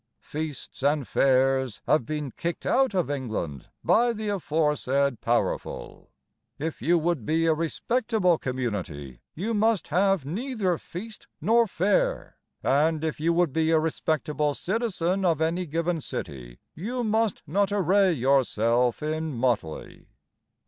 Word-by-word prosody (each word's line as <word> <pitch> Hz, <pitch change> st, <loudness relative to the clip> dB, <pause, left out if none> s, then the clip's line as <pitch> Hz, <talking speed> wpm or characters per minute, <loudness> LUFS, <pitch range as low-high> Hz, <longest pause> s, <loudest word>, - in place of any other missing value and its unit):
Feasts 150 Hz, -4 st, -6 dB
and 145 Hz, -1 st, +1 dB
fairs 130 Hz, -3 st, +2 dB
have 150 Hz, -7 st, +2 dB
been 150 Hz, -3 st, -3 dB
kicked 170 Hz, +6 st, -4 dB
out 265 Hz, -6 st, +2 dB
of 175 Hz, -6 st, +1 dB
England 110 Hz, -, -4 dB
By 240 Hz, +1 st, +3 dB
the 215 Hz, -1 st, -4 dB
aforesaid 150 Hz, -, 0 dB
powerful: 120 Hz, +1 st, -2 dB, 0.5 s
If 155 Hz, -2 st, -4 dB
you 170 Hz, +7 st, +3 dB
would 165 Hz, -5 st, 0 dB
be 160 Hz, +6 st, +1 dB
a 165 Hz, -, +4 dB
respectable 180 Hz, +3 st, +1 dB
community 95 Hz, -, -4 dB
You 210 Hz, +8 st, -2 dB
must 220 Hz, -1 st, +1 dB
have 190 Hz, -1 st, +2 dB
neither 195 Hz, -, -1 dB
feast 215 Hz, +5 st, -9 dB
nor 230 Hz, +7 st, +3 dB
fair, 355 Hz, -, 0 dB, 0.3 s
And, 155 Hz, +3 st, +2 dB
if 160 Hz, -2 st, -2 dB
you 165 Hz, +2 st, +2 dB
would 170 Hz, -5 st, +2 dB
be 160 Hz, 0 st, +1 dB
a 165 Hz, -, +4 dB
respectable 150 Hz, -2 st, -1 dB
citizen 195 Hz, -3 st, -1 dB
of 165 Hz, -4 st, +2 dB
any 170 Hz, +3 st, 0 dB
given 165 Hz, +2 st, -1 dB
city, 65 Hz, -, -6 dB, 0.2 s
You 240 Hz, +9 st, -3 dB
must 220 Hz, -1 st, 0 dB
not 195 Hz, +6 st, +1 dB
array 195 Hz, 0 st, +3 dB
yourself 125 Hz, -3 st, +2 dB
in 155 Hz, +1 st, -2 dB
motley. 115 Hz, -10 st, -2 dB
160 Hz, 135 wpm, -26 LUFS, 135-195 Hz, 0.5 s, a